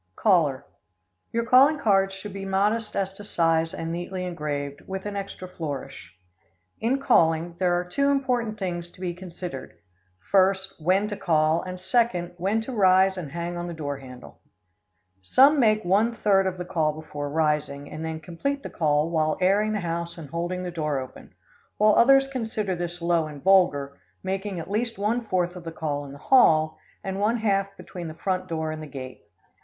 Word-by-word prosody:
Caller 150 -10 +2 0.7
Your 230 0 -1
calling 270 +6 +6
cards 195 -6 +2
should 195 +1 -8
be 195 0 -6
modest 210 +3 0
as 195 -1 -1
to 205 - -11
size 165 -4 +1
and 165 0 -5
neatly 180 +2 -4
engraved, 145 -4 -4
with 190 0 -5
an 205 -1 -4
extra 195 -2 -6
flourish. 145 - -7 0.6
In 250 +5 +1
calling, 170 - +2
there 180 -2 +2
are - - -2
two 280 +11 0
important 250 -6 0
things 175 -3 -4
to - - -19
be 180 -2 -3
considered: 175 -6 -8 0.5
First, 190 -2 +2
when 190 +5 +3
to 205 - -3
call, 160 -4 +2
and, 185 0 -7
second, 185 -3 +1
when 200 +5 +1
to 245 - -6
rise 190 -2 +4
and 165 -7 -6
hang 170 +2 -4
on 175 0 -4
the 170 - -6
door 145 -3 -4
handle. 125 -2 -12 0.8
Some 275 - +5
make 215 -4 +3
one 210 +6 +2
third 195 -3 +3
of 185 -1 -3
the 180 - -5
call 160 -4 0
before 145 -2 -5
rising, 150 -2 0
and 155 +1 -6
then 160 0 -4
complete 280 - -3
the - - -7
call 150 -1 +1
while 155 -2 +1
airing 200 +4 +3
the 210 - -1
house 170 0 -4
and 150 -5 -9
holding 175 +2 -3
the 180 - -4
door 155 -4 -1
open, 130 -1 -10 0.4
while 215 0 +5
others 270 +4 +6
consider 220 -7 -2
this 175 0 -5
low 170 -2 +2
and 145 -2 -10
vulgar, 145 -8 +3 0.2
making 190 0 -3
at 165 - -7
least 225 +2 -1
one 215 +5 0
fourth 180 -4 -1
of 180 - -9
the 165 - -6
call 145 -3 -3
in 140 - -9
the 140 - -10
hall, 155 - +4 0.2
and 195 0 -3
one 215 +4 +2
half 195 -3 0
between 175 -2 -8
the 155 - -8
front 185 +1 -2
door 160 -2 -2
and 155 0 -6
the 155 - -7
gate. 130 -2 -9
180 Hz, 190 wpm, -25 LUFS, 160-205 Hz, 0.8 s, calling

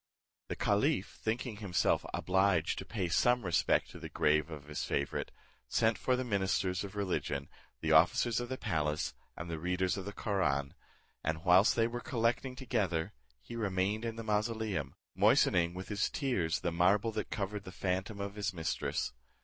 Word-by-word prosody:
The - - -3
caliph - - +1
thinking 115 0 -2
himself 100 -4 +1
obliged 95 -3 +2
to 95 - -6
pay 95 -2 -2
some 120 +6 +3
respect 85 -2 +2
to - - -10
the - - -7
grave 75 +2 +2
of 75 -3 -8
his 75 0 -4
favourite, 70 -1 -1 0.4
sent 110 - +2
for 130 - +1
the 130 - -1
ministers 95 -4 0
of 100 0 -8
religion, 90 -8 -2 0.3
the - - 0
officers 120 -2 +4
of 120 0 -4
the 130 - -3
palace, 75 - -1 0.2
and 85 - -5
the 80 -1 -4
readers 90 +3 0
of 95 - -5
the 100 - -4
Koraun; 70 -11 0 0.5
and, 80 +3 -2
whilst 95 +5 +6
they 115 - +3
were 120 +1 -3
collecting 125 -1 0
together, 105 -11 -1 0.3
he 115 - -8
remained 100 0 0
in 115 -1 -3
the 115 - -6
mausoleum, 105 - -1 0.2
moistening 85 0 +4
with 95 +1 -7
his 105 -1 0
tears 95 - 0
the 85 - 0
marble 95 +6 +3
that 110 -1 -3
covered 100 0 -3
the 95 - -9
phantom 95 +3 -2
of 100 0 -4
his 105 0 -2
mistress. 80 -6 -2
100 Hz, 175 wpm, -33 LUFS, 85-110 Hz, 0.5 s, whilst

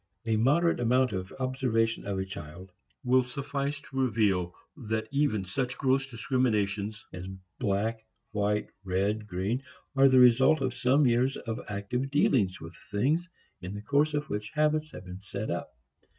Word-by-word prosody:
A 110 -1 +1
moderate 150 +10 +3
amount 125 +1 +3
of 95 -1 -4
observation 125 -5 0
of 100 -1 -2
a 95 - -1
child 95 -1 -9 0.3
will 130 0 +4
suffice 140 +2 -3
to 135 0 -6
reveal 100 -8 +1 0.2
that 110 -5 -3
even 140 -9 +1
such 125 +7 -2
gross 135 0 +1
discriminations 110 -4 0
as 90 +1 -6 0.3
black, 110 0 0 0.3
white, 105 0 0
red, 100 +3 -1
green, 100 +7 -1 0.3
are 135 0 +6
the 130 - +5
result 125 +5 +6
of 130 -2 -1
some 130 +4 +3
years 125 +2 +2
of 115 -1 -4
active 105 +6 -2
dealings 115 -9 +2
with 80 +1 -10
things 150 - +1 0.3
in 90 +2 -6
the 105 - -5
course 145 +5 +2
of 150 +1 -2
which 105 -2 -4
habits 155 0 +2
have 95 - -10
been 90 +1 -8
set 100 +2 -5
up. - - -3
115 Hz, 160 wpm, -29 LUFS, 100-135 Hz, 0.3 s, are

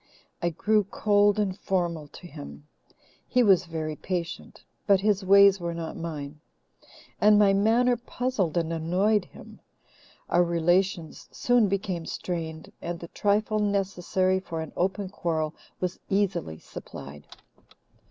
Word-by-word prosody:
I 170 - +1
grew 210 +5 +1
cold 205 +1 +2
and 200 -3 0
formal 175 -6 -2
to 150 - -13
him. 70 - -10 0.6
He 250 - +3
was 190 -4 +4
very 155 -2 -4
patient, 175 0 -5 0.2
but 200 -2 +5
his 205 -1 +1
ways 200 0 +6
were 170 -1 -3
not 165 -1 -5
mine, 155 -3 -6 0.8
and 210 0 +6
my 205 -1 +5
manner 230 +5 +3
puzzled 240 -8 -2
and 165 -1 0
annoyed 180 +5 +1
him. - - -14 0.7
Our 175 - +3
relations 175 0 0
soon 245 -3 +3
became 190 -4 -2
strained, 160 -3 -5
and 175 0 -4
the 170 - -9
trifle 215 +1 +1
necessary 190 -2 0
for 165 -3 -5
an 160 - -7
open 195 +2 -1
quarrel 160 -5 -2 0.3
was 180 0 -3
easily 190 - 0
supplied. 75 -1 -10
185 Hz, 135 wpm, -27 LUFS, 165-205 Hz, 0.8 s, ways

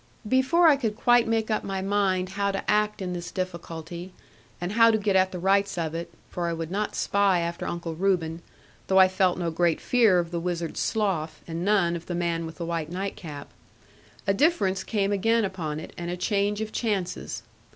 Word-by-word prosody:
Before 265 +9 +4
I 295 -3 +6
could 225 -6 -2
quite 240 +1 +4
make 225 -1 0
up 215 - 0
my 195 -1 -3
mind 190 -2 +1
how 200 +1 -1
to 195 - -4
act 210 -1 +1
in 180 -1 -3
this 175 -1 -5
difficulty, 170 -1 -6 0.5
and 175 +1 -3
how 230 +1 +6
to 220 - +3
get 205 -2 0
at 190 0 +4
the 180 - -5
rights 195 +2 +2
of 165 -2 -2
it 170 +1 -5 0.2
(for 175 -1 -2
I 170 - -1
would 165 0 -5
not 210 +2 -2
spy 200 -3 +2
after 170 0 -3
Uncle 170 -1 -4
Reuben, 170 -2 0 0.5
though 190 - +3
I 190 0 +8
felt 185 -1 +1
no 170 -2 -1
great 170 0 +1
fear 230 -7 +4
of 170 -1 -1
the 170 - -2
Wizard's 170 -1 -3
Slough, 170 -8 -1
and 165 +1 -4
none 190 -4 +2
of 170 0 -7
the 175 - -3
man 170 -1 -1
with 160 - -9
the 170 - -5
white 165 -2 -3
night 190 +2 -3
cap), 145 -5 -8 0.8
a 195 - +3
difference 200 - +2
came 205 -3 0
again 225 +3 +2
upon 165 -6 -4
it, - - -9
and 175 0 -4
a 180 - -3
change 205 +2 0
of 215 0 -4
chances. 200 -7 -2
185 Hz, 210 wpm, -26 LUFS, 170-205 Hz, 0.8 s, I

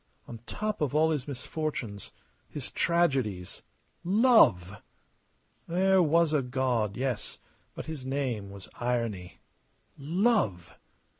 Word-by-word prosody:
On 115 - -8
top 215 -4 -3
of 150 -2 0
all 160 +1 +4
his 145 -3 -2
misfortunes, 130 - -5 0.4
his - - -5
tragedies 135 - 0 0.4
love! 180 - +4 0.9
There 190 +2 +3
was 165 0 +3
a 150 - +3
God, 125 -5 -1
yes, 125 -4 -3 0.4
but - - -6
his 155 -4 -6
name 130 -7 -2
was 100 -1 -10
Irony. 115 -7 -3 0.6
Love! 165 - 0
135 Hz, 105 wpm, -28 LUFS, 110-165 Hz, 0.9 s, all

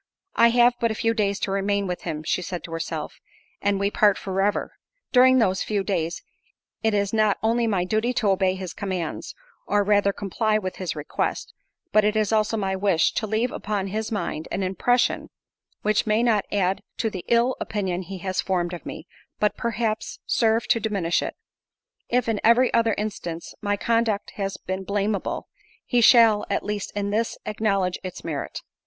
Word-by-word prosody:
"I 235 - +6
have 240 +1 +5
but 230 - +2
a 220 - -2
few 225 +1 +1
days 200 -3 0
to 195 - -1
remain 200 +1 0
with 180 -1 -3
him," 155 -3 -4
she 180 - 0
said 180 0 -5
to 165 - -9
herself, 165 0 -4 0.4
"and 200 -1 +1
we 200 +1 +1
part 205 -2 +4
for 195 0 -2
ever—during 260 - +2
those 190 -6 +2
few 205 -2 -1
days 170 -4 -2 0.6
it 220 -2 +1
is 200 0 0
not 215 -2 +3
only 230 +1 +2
my 195 -5 +1
duty 215 +6 0
to 220 -4 +1
obey 190 -1 +2
his 185 -2 -6
commands, 185 -5 -4 0.3
or 205 0 +2
rather 205 0 +3
comply 215 +2 0
with 185 -3 -4
his 185 -4 -3
request, 150 -1 -3 0.4
but 215 - +5
it 210 +1 +2
is 215 -1 +1
also 220 0 +2
my 190 -2 -1
wish 190 -4 +2
to 215 - -2
leave 220 +4 0
upon 200 -2 -3
his 220 +3 -3
mind 160 -7 -3
an 195 - -1
impression, 240 +7 +1 0.5
which 215 +1 +1
may 215 +2 +3
not 220 -4 +2
add 190 -1 +1 0.2
to 225 - -1
the 185 -3 -6
ill 240 +2 +3
opinion 190 -4 -2
he 190 +1 -7
has 185 +1 -2
formed 180 -2 -1
of 175 - -7
me, - - -7 0.3
but, 210 - +2
perhaps, 225 -1 -2
serve 225 +1 +2
to 230 - +4
diminish 200 -6 0
it. - - -4 0.7
If, 245 0 +1
in 220 -2 0
every 240 +3 +5
other 230 -2 +3
instance, 175 -6 -5
my 205 0 0
conduct 230 -2 0
has 195 -1 -4
been 190 +1 -4
blameable, 200 +1 -2 0.4
he 245 -2 +2
shall, 225 -3 +6
at - - -1
least 205 -1 -3
in 200 0 -1
this, 225 +2 -1
acknowledge 200 -4 0
its 185 -1 -7
merit. 155 -4 -4
205 Hz, 185 wpm, -24 LUFS, 190-220 Hz, 0.7 s, I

